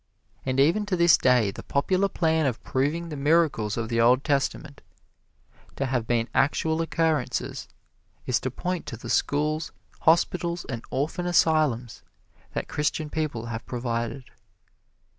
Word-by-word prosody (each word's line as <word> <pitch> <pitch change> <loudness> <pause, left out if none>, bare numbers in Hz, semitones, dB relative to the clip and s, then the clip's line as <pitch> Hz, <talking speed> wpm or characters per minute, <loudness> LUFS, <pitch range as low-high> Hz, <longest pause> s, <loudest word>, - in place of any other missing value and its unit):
And 130 0 0
even 170 +9 +3
to 195 - 0
this 170 -1 +6
day 125 -5 +3
the - - -9
popular 185 +7 +1
plan 160 -4 +1
of 125 - -3
proving 150 +6 -1
the 150 - -5
miracles 145 -7 +2
of 115 -1 -2
the 115 0 +1
Old 125 +3 +4
Testament 140 +1 -1 0.9
to 135 - -1
have 125 -4 -1
been 115 -1 +1
actual 160 +4 +1
occurrences 160 -4 -1 0.6
is 125 - +1
to 130 - -3
point 180 +7 -4
to 115 - -6
the 120 +1 -6
schools, 150 +3 0 0.3
hospitals 170 +1 +2
and 120 -3 -5
orphan 160 +6 -2
asylums 155 -9 +2 0.5
that - - -3
Christian 150 +1 -2
people 145 -8 -2
have 115 -1 -5
provided. 120 +1 -3
140 Hz, 140 wpm, -26 LUFS, 120-160 Hz, 0.9 s, this